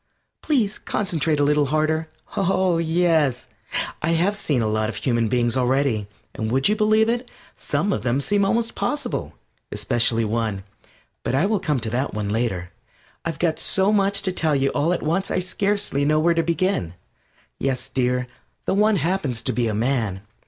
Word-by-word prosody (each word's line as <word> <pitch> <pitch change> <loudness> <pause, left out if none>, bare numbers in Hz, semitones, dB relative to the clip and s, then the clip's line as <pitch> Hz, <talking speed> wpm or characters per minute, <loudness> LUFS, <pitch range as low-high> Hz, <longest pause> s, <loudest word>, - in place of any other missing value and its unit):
Please 235 -9 +1
concentrate 160 -6 -1
a - - +3
little 145 0 +3
harder. 155 +2 0 0.3
Oh! 185 -2 +2
Yes, 160 -6 +2 0.5
I 165 +2 +1
have 180 +5 +2
seen 145 - 0
a - - +1
lot 110 0 0
of - - -5
human 115 -3 0
beings 120 +1 +1
already, 130 -4 +1 0.3
and 110 0 -3
would 130 +2 +3
you 210 - +2
believe 215 +1 +3
it? 240 +2 -1 0.3
some 170 +8 -1
of - - -2
them 120 +3 0
seem 200 +8 +1
almost 230 +3 +1
possible 295 - -3 0.4
especially 115 -2 +1
one. 110 -3 -2 0.6
But - - -1
I 150 +7 +3
will 210 0 +1
come 150 -7 0
to 110 - -3
that 130 0 -1
one 105 -1 -2
later. 105 -5 -2 0.5
I've 165 -1 -2
got 165 -3 0
so 195 +1 +3
much 200 -1 +2
to 185 - +1
tell 160 -4 +1
you 135 0 +2
all 145 +4 +1
at 180 - -1
once 170 +5 0
I - - 0
scarcely 195 -4 0
know 155 +2 +3
where 170 +2 +3
to 165 - +2
begin. 165 - -1 0.6
Yes, 130 -2 -1
dear, 125 0 0 0.4
the - - +1
One 210 +2 +3
happens 165 - -1
to - - -1
be 120 -1 0
a 110 - -1
man. 110 -5 0
150 Hz, 180 wpm, -23 LUFS, 120-190 Hz, 0.6 s, a